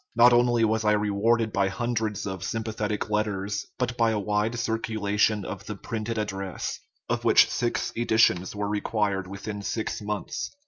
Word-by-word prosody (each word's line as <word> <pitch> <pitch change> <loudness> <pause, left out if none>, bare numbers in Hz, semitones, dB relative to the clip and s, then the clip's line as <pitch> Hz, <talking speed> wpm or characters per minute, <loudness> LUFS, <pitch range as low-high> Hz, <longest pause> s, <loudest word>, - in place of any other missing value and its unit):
Not 120 +1 +7
only 120 -1 +4
was 110 0 +1
I 105 0 +4
rewarded 105 +2 +1
by 100 0 +2
hundreds 110 0 -2
of 95 -3 -4
sympathetic 110 -2 -2
letters, 105 -1 -1
but 125 -1 -2
by 115 -1 +3
a 110 - 0
wide 105 +2 0
circu 115 -1 -2
lation 105 0 +1
of - - -7
the - - -4
printed 115 0 -4
address, 95 -3 -3 0.3
of - - -1
which - - +6
six 120 -1 -1
editions 110 -6 +2
were 105 0 -2
required 105 -2 -1
within 100 +2 -6
six 110 +2 -3
months. 105 0 -3
105 Hz, 165 wpm, -26 LUFS, 100-115 Hz, 0.3 s, Not